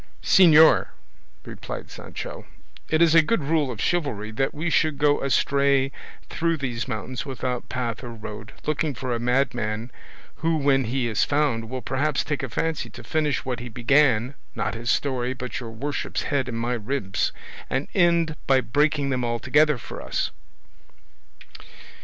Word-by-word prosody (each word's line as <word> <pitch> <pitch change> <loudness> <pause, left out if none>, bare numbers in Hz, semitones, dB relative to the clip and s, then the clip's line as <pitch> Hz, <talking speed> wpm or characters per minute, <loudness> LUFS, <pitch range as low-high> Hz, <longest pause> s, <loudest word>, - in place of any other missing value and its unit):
"Señor," 160 -4 +7 0.6
replied - - -7
Sancho, - - -8 0.4
"is 160 0 +4
it 165 - +8
a - - +4
good 170 0 0
rule 150 -1 +1
of 115 -5 -6
chivalry 110 -12 -1
that 135 +5 0
we 160 +3 -4
should 155 -3 +2
go 145 0 +3
astray 140 0 +2 0.4
through 165 0 0
these 125 -4 -3
mountains 120 +1 -4
without 130 -2 -4
path 125 -1 -3
or 120 - -6
road, 105 -2 -8
looking 155 -1 -1
for 125 +3 -3
a 120 - -1
madman 120 -2 0 0.5
who 165 0 +1
when 135 -3 +2
he 125 +1 -1
is 110 -3 +1
found 140 -6 0
will 130 0 -5
perhaps 140 +2 0
take 145 -1 -2
a 130 - -4
fancy 160 +6 -2
to - - -11
finish 150 -3 0
what 125 -3 -2
he 120 +1 -7
began, 125 0 +3 0.2
not - - -2
his 115 +1 -4
story, 130 -2 0
but 125 0 -5
your 120 -3 -7
worship's 135 +6 -3
head 140 -3 -1
and 115 - -3
my 120 +2 -1
ribs, 110 -4 -1 0.4
and 135 +1 -1
end 170 -3 +3
by 135 -1 +5
breaking 145 +3 +1
them 125 -1 -1
altogether 130 +5 +2
for - - -8
us?" - - -2
135 Hz, 160 wpm, -24 LUFS, 120-150 Hz, 0.6 s, it